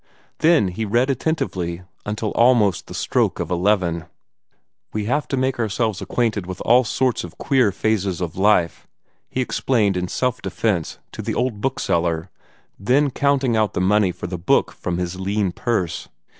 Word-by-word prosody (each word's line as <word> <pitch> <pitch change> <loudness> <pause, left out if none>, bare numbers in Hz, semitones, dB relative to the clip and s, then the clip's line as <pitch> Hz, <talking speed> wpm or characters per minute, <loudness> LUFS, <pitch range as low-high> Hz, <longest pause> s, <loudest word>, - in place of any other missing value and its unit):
Then 160 - +4
he 90 +5 -4
read 120 +6 +2
attentively 90 - -2 0.2
until 105 0 -2
almost 115 -7 +3
the - - -8
stroke - - 0
of - - -3
eleven. 90 -3 +1 0.9
"We 105 -1 -2
have 145 +7 0
to 135 - -2
make 130 0 0
ourselves 110 -2 -1
acquainted 110 -6 -1
with 95 0 -6
all 125 +2 +5
sorts 125 +1 0
of 90 0 -10
queer 130 -7 +2
phases 100 -3 0
of 90 -3 -4
life," 95 -3 +2 0.4
he 130 - -1
explained 115 -5 +1
in 90 0 -1
self 125 +5 -1
defence 95 -8 -1
to - - -6
the - - -3
old 115 -5 -1
bookseller, 85 -9 -1 0.5
then 135 +8 +2
counting 140 -3 +1
out 110 -2 +1
the - - +1
money 100 +1 +3
for 90 - -8
the 90 0 -4
book 85 - +2
from 85 -1 -4
his 90 0 -3
lean 100 0 0
purse. 95 -3 -2
105 Hz, 165 wpm, -21 LUFS, 90-125 Hz, 0.9 s, all